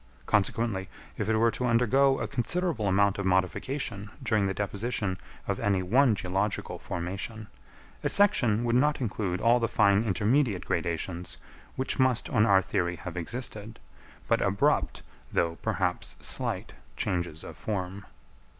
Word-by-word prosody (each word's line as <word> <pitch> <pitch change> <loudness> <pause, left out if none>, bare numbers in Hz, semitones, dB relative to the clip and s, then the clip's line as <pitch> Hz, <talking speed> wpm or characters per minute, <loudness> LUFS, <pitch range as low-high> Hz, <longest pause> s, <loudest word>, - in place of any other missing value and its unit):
Consequently 100 -2 +1 0.3
if 105 - -2
it 110 - +3
were 115 +1 +4
to 125 - -2
undergo 130 +4 +4
a - - -2
considerable 135 - -1
amount 100 +1 +3
of 100 - -2
modification 100 - -1 0.2
during 110 -5 +2
the 95 - -1
deposition 100 -2 -2 0.3
of - - -1
any 100 -2 +1
one 120 +5 +4
geological 95 +2 -2
formation, 95 +6 -5 0.6
a - - +1
section 120 - +3
would 120 -1 0
not 145 +4 +3
include 100 -7 -2
all 120 +2 +4
the 115 - +1
fine 105 -2 +3
intermediate 110 +1 +1
gradations 85 +1 -2 0.4
which 130 +1 -1
must 130 -2 +2
on 110 -2 +4
our 95 -1 +5
theory 90 -2 -1
have 90 0 -8
existed, 110 +3 -5 0.5
but - - +2
abrupt, 100 0 +1 0.3
though 85 -1 0
perhaps - - -1
slight, - - -2 0.2
changes 85 -4 -2
of - - -9
form. 100 -1 -4
105 Hz, 140 wpm, -28 LUFS, 95-120 Hz, 0.6 s, our